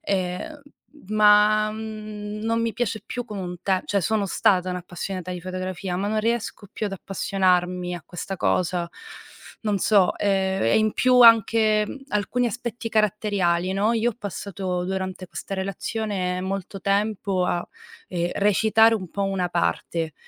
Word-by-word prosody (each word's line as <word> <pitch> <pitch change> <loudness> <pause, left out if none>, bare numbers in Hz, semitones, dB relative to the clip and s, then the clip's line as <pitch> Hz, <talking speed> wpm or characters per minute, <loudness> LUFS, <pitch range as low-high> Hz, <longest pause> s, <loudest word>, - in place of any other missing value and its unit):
ehm, 190 - -3 0.5
ma, 215 0 +5
mhmm, 215 -1 -6
non 230 +1 0
mi 230 0 0
piace 220 -2 -2
più 245 -1 -4
come 205 -4 -5
un 180 0 -5
te 190 -2 +1
cioè 200 - 0
sono 210 +3 0
stata 185 -1 +2
un'appassionata 180 0 -5
di 180 - -5
fotografia, 185 +1 -4
ma 200 +2 -1
non 215 +1 0
riesco 225 -2 -2
più 215 - -3
ad 195 - -5
appassionarmi 180 -2 0
a 175 - -7
questa 185 +2 -6
cosa. 175 -1 0 0.7
Non 210 -2 0
so. 200 -1 +3
Ehm, 190 -1 +1
e 115 - +4
in 215 -1 +2
più 255 -1 +4
anche, 225 -2 +6
mhmm, - - -7
alcuni 210 +3 0
aspetti 235 0 -4
caratteriali, 200 -5 +1
no. 205 +4 +2
Io 230 +1 +2
ho - - -11
passato 185 -1 -4
durante 190 0 -4
questa 195 - -6
relazione 190 -1 -2
molto 195 +1 -4
tempo 200 -2 0
a, 175 -1 -1 0.4
ehm, 175 -1 -1
recitare 220 +3 +4
un 185 -6 -5
po' 200 -1 -2
una 190 -2 -1
parte, 170 -2 -1
195 Hz, 155 wpm, -24 LUFS, 185-215 Hz, 0.7 s, anche